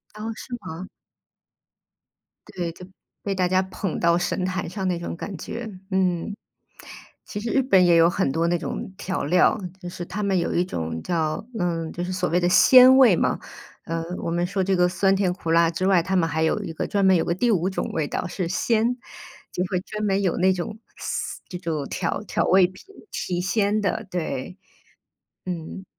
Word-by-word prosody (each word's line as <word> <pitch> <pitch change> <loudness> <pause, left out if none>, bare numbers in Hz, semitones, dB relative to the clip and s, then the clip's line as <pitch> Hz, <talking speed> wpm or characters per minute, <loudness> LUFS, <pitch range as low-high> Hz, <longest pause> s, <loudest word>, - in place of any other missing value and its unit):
哦， 220 +1 -4
是 250 - -9
吗？ 185 0 -7 1.7
对， 175 -2 -3
就， 180 +2 -12 0.4
被 200 - -1
大 185 -1 +1
家 185 +1 +3
捧 190 -1 -4
到 170 0 +3
神 180 +1 -1
坛 185 -2 -2
上 190 +1 -3
那 175 -2 0
种 170 - -5
感 195 +2 -6
觉， 235 +5 -6 0.2
嗯。 185 +1 0 0.9
其 205 - -5
实 230 +2 -4
日 270 - +3
本 190 -8 +5
也 170 -1 +5
有 165 0 +6
很 175 -6 0
多 165 +2 +1
那 175 - +2
种 190 - -5
调 190 0 -2
料， 180 +7 +3 0.2
就 175 - -6
是 175 0 -6
他 210 +4 -5
们 195 -2 +1
有 170 - 0
一 175 - +2
种 80 - -4
叫 160 -1 -1 0.2
嗯， 165 -2 -1
就 175 - -4
是 185 +1 -3
所 180 -1 -1
谓 175 - +2
的 175 - +1
鲜 255 +6 +8
味 230 -9 +7
嘛， - - 0 0.5
呃， 165 0 -2 0.2
我 - - -2
们 175 +1 0
说 190 +1 -1
这 195 0 +1
个 180 0 +4
酸 195 +2 +2
甜 190 -2 +1
苦 175 -3 -6
辣 165 0 +4
之 185 +3 -1
外， 185 -4 +4
他 190 +2 -1
们 165 -3 +2
还 160 +2 0
有 160 - +1
一 - - -5
个 - - -3
专 200 -1 0
门 190 -1 +6
有 165 - +2
个 - - +1
第 235 +7 +1
五 185 -4 +2
种 190 - -3
味 155 -3 -1
道 - - -3
是 180 -1 -3
鲜， 225 +6 +1 0.6
就 180 - -1
会 180 - +1
专 215 +2 -4
门 195 0 +1
有 185 -3 0
那 185 +1 +4
种 185 +4 -5 0.2
嘶 - - -4
这 180 - -5
种 160 -5 -3
调 175 +3 -2
调 - - 0
味 185 -1 +5
品， 185 - -15 0.3
提 175 -1 -2
鲜 205 +3 +1
的， 205 +2 -1
对。 165 0 -4 0.9
嗯。 180 +2 -5
180 Hz, 220 characters per minute, -24 LUFS, 170-195 Hz, 1.7 s, 鲜